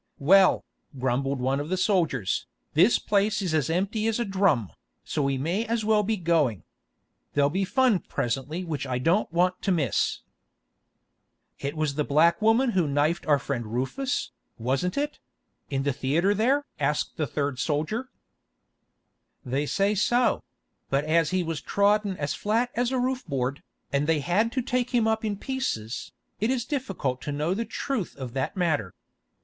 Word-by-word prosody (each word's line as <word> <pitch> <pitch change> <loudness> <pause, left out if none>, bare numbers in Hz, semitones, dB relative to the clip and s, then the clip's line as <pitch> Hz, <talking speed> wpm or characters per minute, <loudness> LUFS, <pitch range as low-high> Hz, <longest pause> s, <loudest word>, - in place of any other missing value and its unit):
"Well," 190 +6 +5 0.3
grumbled 130 +2 0
one 130 +2 0
of 145 +2 -4
the 185 - 0
soldiers, 165 - +1 0.3
"this 180 +9 +5
place 205 +1 +1
is 185 -5 -1
as 155 -3 +1
empty 200 +6 0
as 225 +1 0
a 235 - 0
drum, 190 - +1 0.3
so 150 - -2
we 135 -1 +1
may 170 +11 0
as 230 -1 -1
well 215 -1 +4
be 215 +1 -1
going. 160 - +1 0.7
There'll 145 0 +3
be 190 +3 0
fun 250 -1 +3
presently 140 +7 -3
which 150 -5 -4
I 125 -1 -1
don't 165 +9 +1
want 180 +2 +1
to 195 - 0
miss." 145 - +1 1.4
"It 140 +3 -4
was 155 -2 0
the 150 +1 0
black 155 +6 +3
woman 230 +4 +4
who 180 -7 +1
knifed 145 +5 0
our 145 -2 +5
friend 135 -3 -3
Rufus, 135 - -2 0.3
wasn't 135 - -1
it—in 280 - -5
the 140 -1 +1
theatre 155 +10 +1
there?" 260 +8 +2
asked 150 +1 -1
the 155 - 0
third 140 -1 -2
soldier. 160 - -1 1.4
"They 135 +4 -1
say 200 +6 +2
so; 240 +5 +2 0.5
but 140 +2 +1
as 160 0 +3
he 185 -1 +1
was 165 -2 -3
trodden 200 -1 +2
as 145 -1 -2
flat 230 +4 0
as 245 +1 0
a 260 - 0
roof 255 +1 -1
board, 135 -1 -2 0.3
and 140 +1 +1
they 160 -2 +2
had 205 +9 +1
to 255 - 0
take 250 +1 0
him 230 -2 +3
up 220 0 +1
in 210 -2 -1
pieces, 195 - -3 0.3
it 220 - +1
is 250 -3 0
difficult 195 - -2
to 145 - -4
know 150 +5 0
the 230 +4 -2
truth 250 -8 -3
of 130 -4 -7
that 135 +8 -2
matter. 150 - 0
170 Hz, 170 wpm, -26 LUFS, 140-215 Hz, 1.4 s, Well